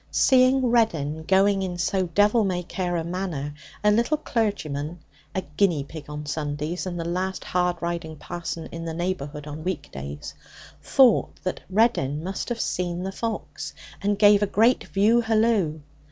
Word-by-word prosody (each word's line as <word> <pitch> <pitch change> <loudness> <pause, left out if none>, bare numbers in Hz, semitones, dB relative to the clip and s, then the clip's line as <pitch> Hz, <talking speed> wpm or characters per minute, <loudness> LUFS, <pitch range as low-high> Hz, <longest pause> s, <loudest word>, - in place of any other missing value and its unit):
Seeing 260 0 +4
Reddin 160 -10 +1
going 195 +1 +4
in 180 -2 -3
so 185 +1 0
devil 205 +6 +3
may 180 -3 -1
care 175 0 -2
a 165 - -1
manner, 170 -5 -3 0.3
a 210 - +5
little 235 +8 +2
clergyman 175 - -2 0.4
(a 190 - -1
'guinea 150 0 +1
pig' 150 +1 -10
on 150 0 -6
Sundays 150 +4 -3
and 175 -1 -4
the 165 - -3
last 185 +2 -2
hard 180 -1 0
riding 170 -2 -3
parson 170 +1 -5
in 165 0 -6
the 165 -1 -4
neighbourhood 155 -4 -3
on 150 +1 -7
weekdays) 75 - -5 0.5
thought 260 -5 +4
that 185 - -3
Reddin 185 - +2
must 190 +6 -4
have 240 -1 -2
seen 175 -3 -2
the 190 - -3
fox, 225 +3 -5 0.3
and 205 0 +1
gave 205 0 +6
a 205 - +2
great 225 +6 +3
view 205 +8 +3
hallo. 220 -8 +2
180 Hz, 160 wpm, -25 LUFS, 160-205 Hz, 0.5 s, gave